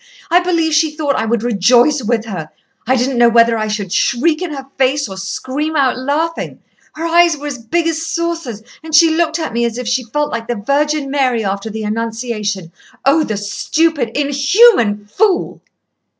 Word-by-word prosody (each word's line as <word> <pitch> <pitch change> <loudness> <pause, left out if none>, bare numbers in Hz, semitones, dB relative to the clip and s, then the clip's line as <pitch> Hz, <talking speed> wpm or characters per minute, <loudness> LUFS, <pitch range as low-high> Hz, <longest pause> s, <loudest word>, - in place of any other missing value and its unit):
I 350 - +6
believe 335 -3 0
she 315 +1 +3
thought 295 -3 0
I - - -1
would 230 0 0
rejoice 245 +5 +3
with 225 0 -1
her. 175 -8 -6 0.4
I 260 - +3
didn't 250 0 0
know 235 0 +6
whether 230 0 +4
I 215 -1 -2
should 205 -3 -3
shriek 310 +7 +1
in 360 -3 -3
her 270 -2 -6
face 270 +1 +1
or 190 - -8
scream 265 +11 -4
out 270 -4 +2
laughing. 295 +6 -2 0.4
Her 320 +2 -5
eyes 340 -1 +4
were 290 - -9
as 285 -4 -5
big 325 +9 -1
as 320 -1 -1
saucers, 320 -8 -3 0.2
and 320 -1 -2
she 325 +1 +6
looked 325 0 0
at 320 -8 -4
me 235 +1 0
as 235 0 -2
if 250 -1 -5
she 250 +1 0
felt 295 +6 -2
like 230 0 -4
the 240 - -2
Virgin 280 +5 -1
Mary 255 -6 +1
after 200 +2 -3
the 220 0 -5
Annunciation. 215 -4 -3 0.3
Oh! 295 +4 +4
the 215 -7 -3
stupid, 275 +5 -1
inhuman 280 - +3
fool!" 365 - 0
265 Hz, 190 wpm, -16 LUFS, 225-315 Hz, 0.4 s, I